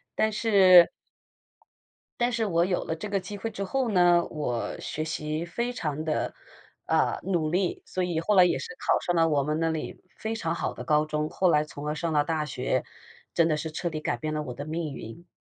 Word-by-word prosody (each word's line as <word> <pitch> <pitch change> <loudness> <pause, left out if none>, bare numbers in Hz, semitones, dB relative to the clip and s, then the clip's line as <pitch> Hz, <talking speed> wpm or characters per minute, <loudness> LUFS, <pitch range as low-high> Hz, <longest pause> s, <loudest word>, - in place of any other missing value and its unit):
但 220 0 +2
是 195 -5 +7 1.3
但 240 +1 +2
是 230 -1 0
我 170 -1 +2
有 185 -2 0
了 160 - -3
这 210 +6 -6
个 200 -1 +1
机 205 +2 -7
会 225 +3 -3
之 200 - -4
后 255 +4 -1
呢， 175 -2 +5
我 125 -7 -3
学 155 - -4
习 155 +1 -3
非 235 +8 -2
常 155 -9 -3
的， 155 -1 -1 0.5
呃， - - +2
努 170 -5 0
力， 180 0 0
所 185 - -2
以 170 -2 -1
后 210 +6 +1
来 185 - +8
也 180 - +2
是 - - -6
考 - - +2
上 175 - -1
了 165 -1 +4
我 145 -2 +2
们 150 +2 -1
那 165 0 +1
里 160 -1 -4 0.2
非 220 +1 -3
常 165 -6 -2
好 - - -2
的 - - -7
高 150 -1 +2
中， 155 0 -2
后 185 -2 +2
来 150 0 +4
从 150 -1 -8
而 150 - 0
上 165 +1 -2
了 145 -1 +3
大 160 -1 -1
学， 130 -3 -1 0.5
真 165 -1 +4
的 155 - +2
是 160 +1 -4
彻 175 +2 -2
底 155 - -3
改 - - -2
变 155 -1 -3
了 155 - -1
我 130 -4 -5
的 145 - -6
命 155 -2 -3
运。 115 +11 -9
165 Hz, 240 characters per minute, -27 LUFS, 155-185 Hz, 1.3 s, 来